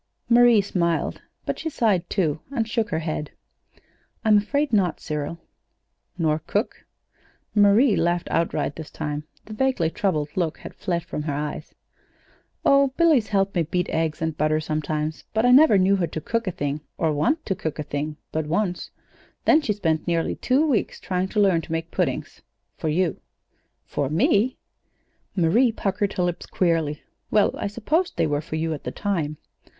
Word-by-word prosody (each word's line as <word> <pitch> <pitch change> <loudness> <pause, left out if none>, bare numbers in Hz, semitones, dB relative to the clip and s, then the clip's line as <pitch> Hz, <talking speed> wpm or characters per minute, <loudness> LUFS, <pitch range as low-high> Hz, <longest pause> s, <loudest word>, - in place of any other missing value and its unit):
Marie 240 -2 +6
smiled, 170 -4 -1 0.2
but - - -2
she 320 - -3
sighed, 205 - +1
too, 160 -7 0
and 235 -6 -1
shook 225 -1 -1
her 160 - -1
head. 155 -2 -3 1.0
"I'm 215 -1 +6
afraid 285 +6 -1
not, 190 -5 +2
Cyril." 150 +2 -4 0.8
"Nor 155 -3 +1
cook?" 205 +8 -3 0.7
Marie 210 +3 +5
laughed 175 0 0
outright 155 -3 0
this 160 -2 -7
time. 150 0 -4 0.2
The 215 - -8
vaguely 215 -9 +1
troubled 155 -8 0
look 165 -4 -1
had - - -10
fled 170 -2 -2
from 150 - -5
her 150 -1 -2
eyes 150 +1 -5 0.9
"Oh, 275 -1 +5
Billy's 315 -10 +4
helped 195 -1 +1
me 175 - +1
beat 180 +3 -1
eggs 160 -1 -1
and 160 -1 -1
butter 155 0 +1
sometimes, 155 0 -3
but 220 +2 +3
I 245 - +5
never 270 -4 +7
knew 190 +1 +4
her 175 -3 0
to 160 - -5
cook 230 +7 -2
a - - +1
thing 145 -2 -3 0.2
or 160 -2 +1
want 230 - +1
to 195 - 0
cook 160 -4 -4
a 150 - -3
thing, 150 +1 -4
but 155 -1 -2
once; 180 +2 -1 0.6
then 315 - +6
she 260 - -1
spent 165 -6 -1
nearly 170 -1 +1
two 270 +5 +2
weeks 260 -9 0
trying 185 0 -1
to 210 - -2
learn 190 -5 +4
to - - -11
make 165 +1 -3
puddings - - -2 0.3
for 160 - -2
you." 175 +2 0 0.6
"For 140 -2 -2
me!" 240 - +2 0.8
Marie 210 +8 +4
puckered 200 -1 -1
her 180 - 0
lips 175 -1 -2
queerly. 165 -4 0 0.3
"Well, 210 -2 +3
I - - -3
supposed 300 - -1
they - - +3
were 145 -1 0
for 155 - -6
you 160 0 -1
at 150 - -7
the - - -4
time. 165 -7 -2
175 Hz, 175 wpm, -24 LUFS, 155-215 Hz, 1.0 s, never